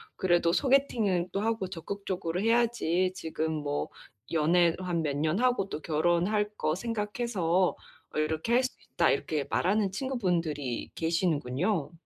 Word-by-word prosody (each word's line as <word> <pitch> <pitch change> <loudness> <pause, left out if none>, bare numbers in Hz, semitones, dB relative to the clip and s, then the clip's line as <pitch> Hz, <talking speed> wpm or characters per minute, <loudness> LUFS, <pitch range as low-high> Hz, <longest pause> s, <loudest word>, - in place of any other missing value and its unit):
그래도 175 -2 +2
소개팅은 230 -10 +2
또 195 - 0
하고 220 -4 -1
적극적으로 180 -1 -4
해야지 225 -6 +2
지금 160 0 -3
뭐 145 -1 -2 0.4
연애 165 +1 +3
한 175 -3 -1
몇 145 -2 -1
년 155 +6 +1
하고 245 -6 +2
또 155 - -5
결혼할 175 +7 +1
거 155 +1 0
생각해서 210 -4 0 0.4
어 - - +1
이렇게 160 +9 0
할 255 +2 +4
수 255 - 0 0.2
있다." - - +3
이렇게 150 -3 -1
말하는 200 +2 +2
친구분들이 175 - -2
계시는군요. 160 - 0
180 Hz, 305 characters per minute, -29 LUFS, 160-210 Hz, 0.4 s, 할